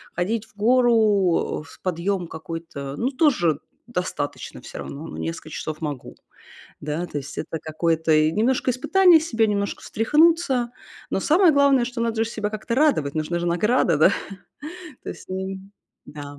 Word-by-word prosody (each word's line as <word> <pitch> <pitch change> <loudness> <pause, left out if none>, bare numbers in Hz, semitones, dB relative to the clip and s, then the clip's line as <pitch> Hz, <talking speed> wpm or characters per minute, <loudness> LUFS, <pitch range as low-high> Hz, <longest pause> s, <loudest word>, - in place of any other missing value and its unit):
ходить 210 +5 -1
в 205 - -28
гору, 220 -7 +3
э, - - -12
в - - -16
подъём 180 0 -1
какой-то, 160 -4 -7
ну 255 +4 0
тоже 230 - +2 0.3
достаточно 180 -10 -4
всё - - -9
равно, 145 +3 -7
ну - - -8
несколько 165 -1 -5
часов 155 +1 -5
могу. 145 -5 -5 0.6
Да, 150 +4 -3
то 150 - -6
есть 140 0 -7
это 160 - -4
какое-то 160 0 0
и 155 +1 +4
немножко 250 +5 +1
испытание 355 +6 +5
себя, 230 -9 +1
немножко 200 -1 -2
встряхнуться. 295 -1 +2 0.4
Но - - 0
самое 330 - +4
главное, 280 -3 +4
что 245 -1 -6
надо 225 -1 0
же 225 - -4
себя 210 -2 -3
как-то 215 +2 -4
радовать, 260 - +2
нужна 160 +2 -2
же 175 - -2
награда, 180 - +2
да. 160 +6 +6 0.9
То - - -8
есть - - -8
н 190 +1 -5 0.3
да. 145 -1 -9
195 Hz, 160 wpm, -23 LUFS, 160-240 Hz, 0.9 s, да